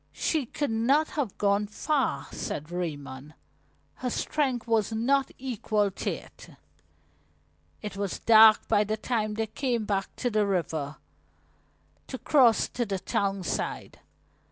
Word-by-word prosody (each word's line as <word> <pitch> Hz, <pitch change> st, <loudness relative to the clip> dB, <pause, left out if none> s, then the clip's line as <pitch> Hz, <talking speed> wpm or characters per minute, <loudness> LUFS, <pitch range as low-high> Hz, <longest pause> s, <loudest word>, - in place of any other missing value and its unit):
"She 305 Hz, -6 st, -1 dB
could 290 Hz, 0 st, -2 dB
not 265 Hz, +8 st, +2 dB
have 270 Hz, -10 st, -3 dB
gone 205 Hz, 0 st, +2 dB
far," 285 Hz, +7 st, -1 dB
said 150 Hz, +3 st, -5 dB
Raymond. 150 Hz, -4 st, -5 dB, 0.6 s
"Her 255 Hz, -, -2 dB
strength 260 Hz, -1 st, -1 dB
was 225 Hz, -2 st, +1 dB
not 265 Hz, +5 st, +1 dB
equal 215 Hz, -5 st, -1 dB
to -, -, -3 dB
it." -, -, -8 dB, 1.3 s
It 210 Hz, -2 st, -5 dB
was 200 Hz, -2 st, -3 dB
dark 220 Hz, -1 st, +7 dB
by 210 Hz, -2 st, +3 dB
the 215 Hz, +1 st, -2 dB
time 215 Hz, -2 st, -1 dB
they 225 Hz, +1 st, -1 dB
came 235 Hz, 0 st, -2 dB
back 195 Hz, -2 st, -2 dB
to 245 Hz, -, -2 dB
the 210 Hz, -1 st, +2 dB
river, 160 Hz, -6 st, -2 dB, 1.1 s
to 260 Hz, -, -5 dB
cross 250 Hz, -5 st, +4 dB
to 245 Hz, -, -2 dB
the 200 Hz, -4 st, -2 dB
town 195 Hz, +1 st, -1 dB
side. -, -, -4 dB
215 Hz, 135 wpm, -27 LUFS, 195-250 Hz, 1.3 s, dark